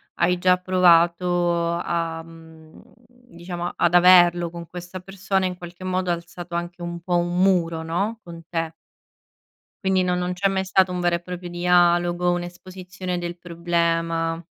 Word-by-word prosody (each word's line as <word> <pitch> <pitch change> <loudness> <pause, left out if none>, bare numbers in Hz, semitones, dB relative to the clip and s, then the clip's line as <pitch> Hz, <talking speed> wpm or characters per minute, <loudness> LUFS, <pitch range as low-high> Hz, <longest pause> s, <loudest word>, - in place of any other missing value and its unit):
hai 180 +1 +2
già 180 +1 +3
provato 175 -1 +2
a, 165 -1 -2
mhmm, 160 -1 -16 0.3
diciamo 175 -8 -7
ad 175 - +1
averlo 175 -1 +6
con 170 0 -9
questa 180 +2 -8
persona, 190 +1 -2
in 180 -1 -3
qualche 175 +1 -10
modo 185 0 -1
ha - - +3
alzato 170 0 -8
anche 175 +1 -5
un 170 0 -5
po' 175 +1 -2
un 175 0 -1
muro 170 -4 +2
no, 200 +8 -2
con 170 -1 -10
te. 165 -1 -3 1.1
Quindi 190 -1 +2
non 180 0 0
non 180 0 -2
c'è 190 +2 0
mai 190 -1 -1
stato 190 0 +2
un 180 - -3
vero 175 -1 +1
e 170 - -4
proprio 180 0 -7
dialogo, 175 0 +2
un'esposizione 180 +1 -6
del 175 0 -4
problema. 165 -1 -1
175 Hz, 155 wpm, -23 LUFS, 170-180 Hz, 1.1 s, averlo